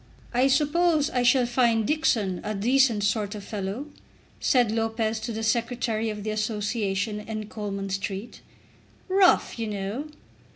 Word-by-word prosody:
"I 250 Hz, +2 st, +4 dB
suppose 305 Hz, +2 st, +2 dB
I 250 Hz, -, +1 dB
shall 250 Hz, +1 st, +4 dB
find 235 Hz, -2 st, +2 dB
Dixon 225 Hz, -, +1 dB
a 215 Hz, -, -3 dB
decent 235 Hz, 0 st, +3 dB
sort 205 Hz, 0 st, 0 dB
of 205 Hz, -, -7 dB
a -, -, -13 dB
fellow?" 205 Hz, +5 st, -4 dB, 0.5 s
said 245 Hz, -5 st, +3 dB
Lopez 225 Hz, 0 st, -1 dB
to 235 Hz, +2 st, -4 dB
the 225 Hz, 0 st, -4 dB
Secretary 230 Hz, -1 st, 0 dB
of 210 Hz, -1 st, -5 dB
the 215 Hz, -, -2 dB
Association 210 Hz, -1 st, -1 dB
in 215 Hz, 0 st, -5 dB
Coleman 200 Hz, -2 st, -4 dB
Street. 195 Hz, +3 st, -4 dB, 0.7 s
"Rough, 375 Hz, -9 st, +3 dB
you 225 Hz, -, -2 dB
know." 210 Hz, +7 st, -4 dB
225 Hz, 150 wpm, -26 LUFS, 210-250 Hz, 0.7 s, I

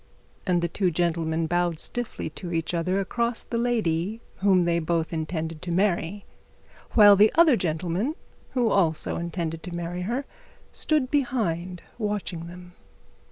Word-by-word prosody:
And 175 Hz, -2 st, +2 dB
the -, -, +2 dB
two 185 Hz, +2 st, 0 dB
gentlemen 165 Hz, -1 st, 0 dB
bowed 175 Hz, 0 st, 0 dB
stiffly 240 Hz, -8 st, -3 dB
to 175 Hz, +2 st, -6 dB
each 165 Hz, 0 st, -1 dB
other 180 Hz, +3 st, 0 dB
across 235 Hz, +4 st, -1 dB
the 230 Hz, -, -3 dB
lady 220 Hz, -4 st, 0 dB, 0.2 s
they 180 Hz, -4 st, +3 dB
both 165 Hz, 0 st, -1 dB
intended 160 Hz, 0 st, -3 dB
to 180 Hz, -1 st, -4 dB
marry, 190 Hz, +1 st, 0 dB, 0.7 s
while 205 Hz, -2 st, +8 dB
the 210 Hz, +2 st, +6 dB
other 325 Hz, -4 st, +6 dB
gentleman 180 Hz, -, -1 dB, 0.4 s
who 240 Hz, -3 st, +2 dB
also 165 Hz, -5 st, +1 dB
intended 170 Hz, -1 st, -3 dB
to 175 Hz, 0 st, -7 dB
marry 175 Hz, +1 st, -4 dB
her 265 Hz, +4 st, -1 dB, 0.5 s
stood 300 Hz, -5 st, +1 dB
behind, 185 Hz, -, -1 dB, 0.2 s
watching 205 Hz, -6 st, -3 dB
them. 180 Hz, 0 st, -11 dB
180 Hz, 140 wpm, -26 LUFS, 165-210 Hz, 0.7 s, while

